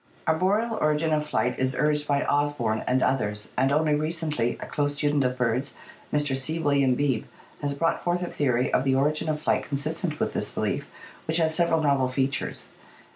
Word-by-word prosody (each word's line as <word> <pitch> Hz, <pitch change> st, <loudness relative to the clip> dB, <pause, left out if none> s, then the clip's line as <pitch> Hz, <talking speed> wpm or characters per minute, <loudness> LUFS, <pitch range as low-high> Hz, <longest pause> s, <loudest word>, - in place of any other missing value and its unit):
Arboreal 205 Hz, +8 st, +1 dB
origin 155 Hz, +1 st, +2 dB
of 150 Hz, -1 st, +1 dB
flight 125 Hz, -5 st, -1 dB
is 130 Hz, 0 st, 0 dB
urged 150 Hz, 0 st, +1 dB
by 140 Hz, -1 st, +2 dB
Osborn 145 Hz, -7 st, 0 dB
and 130 Hz, +1 st, +2 dB
others, 105 Hz, -5 st, -1 dB
and 135 Hz, +2 st, +2 dB
only 150 Hz, +1 st, +2 dB
recently 155 Hz, -5 st, -1 dB
a -, -, -5 dB
close 145 Hz, 0 st, -1 dB
student 145 Hz, 0 st, +1 dB
of 125 Hz, 0 st, -1 dB
birds, 125 Hz, +2 st, -1 dB, 0.4 s
Mr. 145 Hz, -2 st, +1 dB
C. 145 Hz, +5 st, -2 dB
William 140 Hz, -5 st, +2 dB
Beebe, 130 Hz, -4 st, 0 dB, 0.3 s
has 145 Hz, -1 st, -1 dB
brought 165 Hz, +3 st, 0 dB
forth 175 Hz, +1 st, 0 dB
a -, -, 0 dB
theory 130 Hz, -6 st, 0 dB
of -, -, +3 dB
the 135 Hz, -1 st, +2 dB
origin 150 Hz, +3 st, +1 dB
of 155 Hz, -1 st, -1 dB
flight -, -, +1 dB
consistent 155 Hz, +3 st, -3 dB
with -, -, -1 dB
this -, -, 0 dB
belief, -, -, -2 dB, 0.4 s
which 160 Hz, +1 st, +2 dB
has 160 Hz, -1 st, +2 dB
several 165 Hz, -1 st, +2 dB
novel 140 Hz, -3 st, +2 dB
features. 135 Hz, +2 st, -2 dB
145 Hz, 185 wpm, -26 LUFS, 130-155 Hz, 0.4 s, of